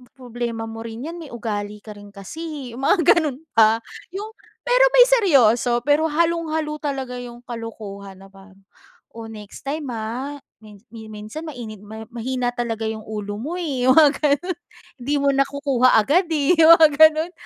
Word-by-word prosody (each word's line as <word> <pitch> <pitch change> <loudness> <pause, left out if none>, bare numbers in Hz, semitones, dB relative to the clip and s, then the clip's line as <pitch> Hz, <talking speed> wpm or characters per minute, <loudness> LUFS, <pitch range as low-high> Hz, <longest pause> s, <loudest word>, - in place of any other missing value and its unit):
problema 240 -3 -5
mo 225 +1 -8
rin 230 +4 -7
'yan, 345 - -8
eh. - - -12
May - - -16
ugali 210 -3 -4
ka 210 -1 -11
rin 205 0 -13
kasi, 290 - -8
eh." - - -10
yung 270 - -7
mga 365 +1 +3 0.2
gano'n 295 -6 -1 0.2
pa. 225 0 +5 0.3
Yung 420 +3 -6 0.4
pero - - +4
may - - +8
seryoso, 245 - +3
pero 300 +2 +3
halong-halo 320 -1 -1
talaga 270 -4 -4
yung 240 -1 -10
kalokohan 205 -5 -8
na 195 - -13
parang, 195 0 -18 0.6
"Oh, 225 -1 -8
next 210 -2 -11
time, 295 0 -3
ah, 240 +6 -5 0.2
min 210 -2 -15
yun 220 -1 -10
minsan 215 +10 -8
mainit 240 -8 -8
mahi 220 +1 -9
mahina 245 +1 -2
talaga 230 -2 -3
yung 220 -1 -6
ulo 210 -1 -5
mo, 305 +10 -5
eh," 265 -7 -2
yung 260 - +6
mga 305 -3 +7
gano'n. 305 +4 0 0.4
"Hindi 285 +4 -1
mo 280 - +3
nakukuha 275 -2 +2
agad, 325 - +2
eh." 300 +2 +2
yung 320 +1 +8
mga 315 -1 +6
gano'n. 315 +2 +5
250 Hz, 180 wpm, -21 LUFS, 220-305 Hz, 0.6 s, may